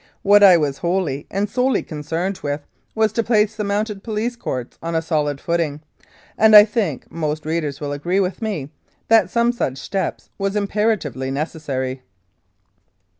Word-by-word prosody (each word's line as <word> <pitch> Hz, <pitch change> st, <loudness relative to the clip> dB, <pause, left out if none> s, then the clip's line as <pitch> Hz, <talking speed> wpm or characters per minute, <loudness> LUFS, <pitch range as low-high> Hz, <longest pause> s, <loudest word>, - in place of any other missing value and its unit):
What 205 Hz, +1 st, +6 dB
I 190 Hz, -3 st, +8 dB
was 140 Hz, -4 st, -1 dB
wholly 170 Hz, -5 st, -1 dB
and 200 Hz, +2 st, -1 dB
solely 250 Hz, +4 st, +1 dB
concerned 165 Hz, +5 st, -3 dB
with 145 Hz, 0 st, -3 dB, 0.3 s
was 220 Hz, -1 st, +2 dB
to 230 Hz, -, +1 dB
place 215 Hz, -2 st, +2 dB
the 215 Hz, -, -3 dB
Mounted 205 Hz, 0 st, -2 dB
Police 225 Hz, +2 st, -2 dB
Courts 130 Hz, -, -5 dB
on 165 Hz, 0 st, -3 dB
a 160 Hz, -, +2 dB
solid 150 Hz, -3 st, -1 dB
footing, 165 Hz, -3 st, -1 dB, 0.6 s
and 220 Hz, 0 st, +7 dB
I 210 Hz, 0 st, +11 dB
think 205 Hz, -, -3 dB
most 155 Hz, -1 st, -3 dB
readers 155 Hz, -3 st, -2 dB
will 145 Hz, -1 st, -4 dB
agree 175 Hz, +7 st, -1 dB
with 190 Hz, +2 st, -1 dB
me 185 Hz, -11 st, -3 dB, 0.4 s
that 225 Hz, -3 st, +5 dB
some 235 Hz, 0 st, +2 dB
such 140 Hz, -, -2 dB
step 190 Hz, +6 st, -3 dB, 0.2 s
was 195 Hz, +1 st, -1 dB
imperatively 200 Hz, -, -1 dB
necessary. 135 Hz, -3 st, -3 dB
175 Hz, 160 wpm, -20 LUFS, 150-210 Hz, 0.6 s, I